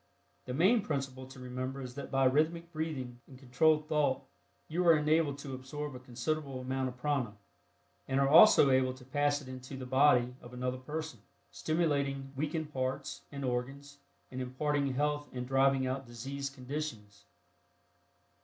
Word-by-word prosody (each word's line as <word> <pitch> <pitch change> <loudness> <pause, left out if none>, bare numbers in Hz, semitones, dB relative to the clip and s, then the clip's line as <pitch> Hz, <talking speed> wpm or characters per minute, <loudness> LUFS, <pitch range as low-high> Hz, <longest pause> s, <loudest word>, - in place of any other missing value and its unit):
The 125 - -4
main 200 - +4
principle 135 -7 -4
to 135 0 -12
remember 130 +1 -4
is 125 -2 -6
that 140 - -7
by 135 0 +2
rhythmic 160 +5 +2
breathing 140 -7 -4
and 130 - -13
controlled 150 +4 +2
thought 150 -3 +1 0.4
you 170 +3 0
are 165 -2 +8
enabled 150 -1 +2
to 140 -1 -7
absorb 140 +3 -5
a 125 - -8
considerable 130 +3 -3
amount 130 +1 -2
of 125 - -11
prana, 125 -6 -1 0.7
and 135 0 +1
are 140 - +4
also 160 -2 +8
able 130 0 +3
to 130 -1 -14
pass 145 +2 +1
it - - -12
into 130 +1 -8
the 130 - -6
body 125 -2 +4
of 120 - -12
another 125 +1 -2
person, 155 +4 -5 0.3
stimulating 140 -4 0
weakened 155 +2 -3
parts 130 +1 -3
and 140 -1 -4
organs 135 +3 -4 0.3
and 130 0 -4
imparting 140 +2 0
health 145 +1 0
and 125 0 -4
driving 135 0 +3
out 130 0 -3
diseased 135 +4 -5
conditions. 125 -7 -6
135 Hz, 160 wpm, -32 LUFS, 130-150 Hz, 0.7 s, are